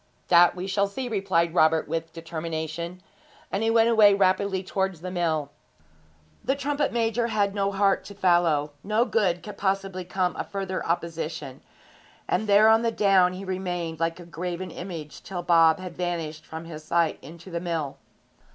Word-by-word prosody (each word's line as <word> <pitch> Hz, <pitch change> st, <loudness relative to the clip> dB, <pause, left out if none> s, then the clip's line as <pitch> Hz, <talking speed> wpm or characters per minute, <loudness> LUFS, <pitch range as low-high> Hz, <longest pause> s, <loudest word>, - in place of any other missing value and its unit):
'That 175 Hz, 0 st, +6 dB
we 180 Hz, +1 st, -5 dB
shall 200 Hz, +1 st, +1 dB
see,' 245 Hz, +6 st, -5 dB
replied 190 Hz, -6 st, 0 dB
Robert 160 Hz, -2 st, +3 dB
with 165 Hz, +1 st, -3 dB
determination; 165 Hz, +1 st, -5 dB, 0.5 s
and 200 Hz, -, -1 dB
he 225 Hz, -, +2 dB
went 225 Hz, 0 st, +4 dB
away 215 Hz, -3 st, +6 dB
rapidly 190 Hz, 0 st, +1 dB
towards 190 Hz, -3 st, -2 dB
the 185 Hz, +1 st, -5 dB
mill. 160 Hz, -5 st, -1 dB, 0.9 s
The 270 Hz, -, +1 dB
trumpet 285 Hz, +1 st, -1 dB
major 230 Hz, 0 st, 0 dB
had 205 Hz, -3 st, 0 dB
no 200 Hz, -1 st, 0 dB
heart 195 Hz, 0 st, +2 dB
to 200 Hz, -, -10 dB
follow 175 Hz, -6 st, +2 dB
no 215 Hz, +4 st, +2 dB
good 185 Hz, -8 st, +1 dB
could 210 Hz, -2 st, -9 dB
possibly 195 Hz, -1 st, -1 dB
come 180 Hz, -1 st, -1 dB
of -, -, -5 dB
further 195 Hz, -2 st, -3 dB
opposition; 165 Hz, -5 st, -3 dB, 0.7 s
and 215 Hz, -, 0 dB
there 205 Hz, +1 st, +6 dB
on 220 Hz, 0 st, +6 dB
the 230 Hz, -, +1 dB
down 195 Hz, -4 st, +4 dB
he 190 Hz, +2 st, -7 dB
remained 175 Hz, -4 st, -3 dB
like 165 Hz, +1 st, -1 dB
a 175 Hz, -, -10 dB
graven 175 Hz, +1 st, -5 dB
image 165 Hz, -5 st, -7 dB
till 180 Hz, -2 st, -6 dB
Bob 165 Hz, -2 st, +5 dB
had 185 Hz, -2 st, -8 dB
vanished 165 Hz, -3 st, -4 dB
from 160 Hz, +1 st, -7 dB
his 155 Hz, -2 st, -9 dB
sight 165 Hz, 0 st, +1 dB
into 170 Hz, +6 st, -12 dB
the 170 Hz, -, -2 dB
mill. 165 Hz, -5 st, -3 dB
180 Hz, 170 wpm, -26 LUFS, 165-200 Hz, 0.9 s, That